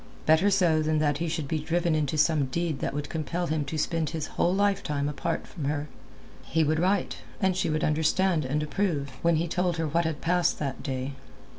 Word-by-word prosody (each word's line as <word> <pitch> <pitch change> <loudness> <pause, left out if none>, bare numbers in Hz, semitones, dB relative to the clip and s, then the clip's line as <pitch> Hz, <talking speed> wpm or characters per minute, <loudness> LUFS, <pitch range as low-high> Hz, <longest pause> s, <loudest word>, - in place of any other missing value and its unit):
Better 160 +6 +5
so 175 -6 +3
than 155 0 +1
that 145 -2 +1
he 170 - -1
should 160 -3 -2
be 155 +2 -1
driven 170 +2 0
into 155 -1 0
some 150 -2 +3
deed 160 +1 -2
that - - -2
would 145 0 -3
compel 170 +2 -2
him 155 -2 0
to 155 +3 -4
spend 160 0 0
his 160 -2 -3
whole 175 - +2
lifetime 190 -8 +1
apart 150 +3 -2
from 155 -7 -6
her. 145 +1 -2 0.5
He 160 0 +1
would 155 +1 +1
write, 190 +2 +1 0.2
and 190 -2 +2
she 185 - 0
would 155 0 0
understand 160 +2 +2
and 145 +4 -1
approve 150 -5 -1
when 170 0 +3
he 165 +2 0
told 180 0 0
her 160 -1 0
what 165 +3 +1
had 160 -2 -2
passed 175 +1 +1
that 140 -3 -3
day. 130 +1 -3
160 Hz, 210 wpm, -27 LUFS, 150-175 Hz, 0.5 s, Better